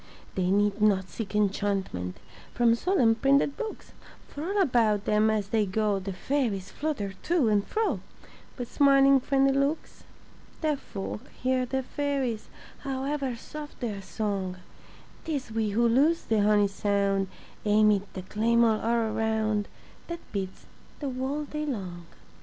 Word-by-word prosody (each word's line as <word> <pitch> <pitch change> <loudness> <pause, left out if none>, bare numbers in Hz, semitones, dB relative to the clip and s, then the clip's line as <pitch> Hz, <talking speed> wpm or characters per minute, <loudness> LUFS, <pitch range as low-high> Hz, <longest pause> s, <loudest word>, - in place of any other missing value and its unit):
They 185 -1 0
need 205 +1 +2
not 190 -3 +3
seek 210 +1 -6
enchantment 195 - -1 0.4
From 240 -1 +4
solemn 240 -3 +3
printed 275 +4 +2
books, 445 -2 -6 0.4
For 290 - -7
all 395 +5 0
about 230 - +3
them 215 +1 +3
as 210 -2 0
they 220 -1 +2
go 205 +1 +1
The 195 +1 -5
fairies 200 -1 -1
flutter 275 -11 -3
to 320 -9 +2
and 205 -1 +3
fro 440 0 0 0.6
With 245 -2 -5
smiling 275 -1 +6
friendly 275 +1 +2
looks. 275 +3 -1 0.6
Deaf 305 -3 +1
folk 210 +4 -6
hear 255 0 +1
the 265 +1 -1
fairies, 270 -5 -2 0.3
However 270 -1 -2
soft 295 +5 -9
their 215 -5 -3
song; 195 -2 -3 0.7
Tis 285 -7 -3
we 220 -1 0
who 235 +4 +2
lose 290 +8 +3
the 220 -2 +1
honey 205 0 +4
sound 200 -1 0 0.4
Amid 210 -1 +3
the 185 - -6
clamor 225 +2 +2
all 230 -1 +1
around 220 -2 0 0.4
That 340 0 -5
beats 190 -2 -4 0.3
the 280 -3 -3
whole 265 +4 -2
day 300 +1 -4
long. 180 - -5
225 Hz, 140 wpm, -28 LUFS, 205-275 Hz, 0.7 s, smiling